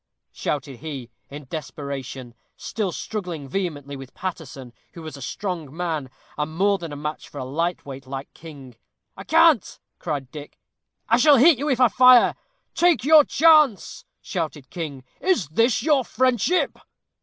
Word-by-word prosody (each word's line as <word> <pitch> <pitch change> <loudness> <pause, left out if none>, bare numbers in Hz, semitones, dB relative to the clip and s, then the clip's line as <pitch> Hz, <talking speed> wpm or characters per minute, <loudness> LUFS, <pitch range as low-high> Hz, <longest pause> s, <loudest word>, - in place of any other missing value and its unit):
shouted 140 -3 -4
he, 135 -4 -8 0.2
in 145 0 -9
desperation, 135 -4 -7 0.2
still 210 -5 -3
struggling 175 -8 -5
vehemently 145 -4 -4
with 135 -1 -11
Paterson, 140 -9 -7 0.2
who 165 - -10
was 155 -1 -8
a 140 - -11
strong 170 -1 -5
man, 160 -6 -3 0.3
and 155 +1 -3
more 200 +1 +2
than 165 -3 -7
a - - -6
match 150 +1 -6
for - - -12
a 130 - -4
light 165 +6 -2
weight 135 -1 -9
like 135 +1 -7
King. 140 -7 -12 0.4
"I - - -9
can't," 315 - +3 0.2
cried 145 -6 -4
Dick; 150 -1 -10 0.5
"I - - +4
shall 295 -2 +6
hit 280 +1 +6
you, 295 +2 -2
if 260 -3 +1
I 250 - +6
fire." 250 +2 +6 0.4
"Take 345 -5 +3
your 310 0 +8
chance," 305 - +3 0.2
shouted 155 -6 -5
King. 150 -7 -6 0.2
"Is 350 - 0
this 225 +9 +1
your 295 -4 +3
friendship?" 255 - 0
160 Hz, 155 wpm, -23 LUFS, 140-230 Hz, 0.5 s, your